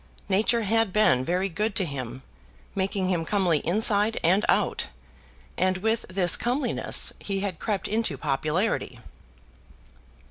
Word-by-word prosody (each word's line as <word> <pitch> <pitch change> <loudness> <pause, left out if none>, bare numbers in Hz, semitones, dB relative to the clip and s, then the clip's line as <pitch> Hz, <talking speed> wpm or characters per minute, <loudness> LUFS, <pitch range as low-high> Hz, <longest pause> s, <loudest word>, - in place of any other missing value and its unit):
Nature 220 +4 +2
had 225 0 +1
been 180 -11 +3
very 180 +6 -1
good 205 +4 -3
to 190 - +3
him, 130 -4 -6 0.5
making 190 -1 -1
him 175 -3 0
comely 175 -3 +1
inside 210 +5 +3
and 185 +5 +3
out, - - +1 0.7
and 185 0 +1
with 220 +4 -1
this 185 -2 +3
comeliness 250 +4 0
he 195 -1 -3
had 195 -5 -4
crept 205 -3 -2
into 215 -9 -1
popularity. 155 - -2
190 Hz, 130 wpm, -25 LUFS, 170-215 Hz, 0.7 s, been